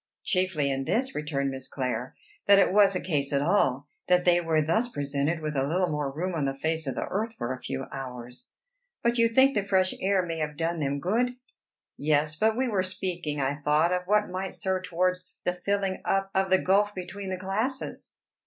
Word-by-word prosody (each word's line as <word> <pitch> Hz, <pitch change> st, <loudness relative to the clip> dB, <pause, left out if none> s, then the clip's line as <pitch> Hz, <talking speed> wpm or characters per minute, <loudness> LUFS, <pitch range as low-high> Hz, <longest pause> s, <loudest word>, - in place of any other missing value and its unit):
"Chiefly 180 Hz, -7 st, +1 dB
in 135 Hz, 0 st, -2 dB
this," 260 Hz, -, 0 dB
returned 140 Hz, -2 st, -2 dB
Miss 130 Hz, -1 st, -6 dB
Clare, 125 Hz, -1 st, -3 dB, 0.3 s
"that 200 Hz, -, +8 dB
it 195 Hz, -, +4 dB
was 200 Hz, -2 st, +5 dB
a -, -, +1 dB
case 145 Hz, -7 st, -1 dB
at 140 Hz, 0 st, +1 dB
all 145 Hz, -6 st, +2 dB, 0.2 s
that 180 Hz, 0 st, +3 dB
they 175 Hz, -1 st, +5 dB
were 165 Hz, -2 st, +1 dB
thus 195 Hz, +11 st, +1 dB
presented 145 Hz, -, -1 dB
with 150 Hz, -1 st, -3 dB
a 135 Hz, -, +2 dB
little 175 Hz, +5 st, +1 dB
more 150 Hz, -2 st, -1 dB
room 175 Hz, +6 st, -3 dB
on 155 Hz, -4 st, -1 dB
the 135 Hz, 0 st, -1 dB
face 160 Hz, +2 st, -1 dB
of 135 Hz, -, -2 dB
the -, -, -2 dB
earth 220 Hz, +4 st, -3 dB
for 130 Hz, -, -3 dB
a 130 Hz, -, -8 dB
few 135 Hz, +1 st, -4 dB
hours." 125 Hz, -, -7 dB, 0.5 s
"But 235 Hz, 0 st, +2 dB
you 230 Hz, 0 st, +5 dB
think 265 Hz, +4 st, +5 dB
the 205 Hz, -, +1 dB
fresh 190 Hz, -2 st, +2 dB
air 190 Hz, -1 st, +2 dB
may 165 Hz, -1 st, -4 dB
have 150 Hz, -1 st, -3 dB
done 165 Hz, +1 st, -1 dB
them 140 Hz, -1 st, -1 dB
good?" 240 Hz, -, 0 dB, 0.6 s
"Yes; 150 Hz, +1 st, +1 dB
but 220 Hz, +6 st, +2 dB
we 260 Hz, 0 st, +1 dB
were 205 Hz, -5 st, +1 dB
speaking, 180 Hz, -5 st, -3 dB
I 135 Hz, 0 st, +1 dB
thought, 150 Hz, +4 st, +2 dB
of 180 Hz, 0 st, -2 dB
what 210 Hz, +1 st, +3 dB
might 185 Hz, +1 st, -4 dB
serve 190 Hz, -2 st, -2 dB
towards 180 Hz, +1 st, -1 dB
the 180 Hz, -, +1 dB
filling 195 Hz, +1 st, -1 dB
up 195 Hz, 0 st, 0 dB
of 190 Hz, 0 st, +1 dB
the 190 Hz, -, +6 dB
gulf 205 Hz, +2 st, +3 dB
between 190 Hz, +2 st, -6 dB
the 185 Hz, -, -2 dB
classes." 215 Hz, +9 st, -3 dB
180 Hz, 210 wpm, -27 LUFS, 145-195 Hz, 0.6 s, that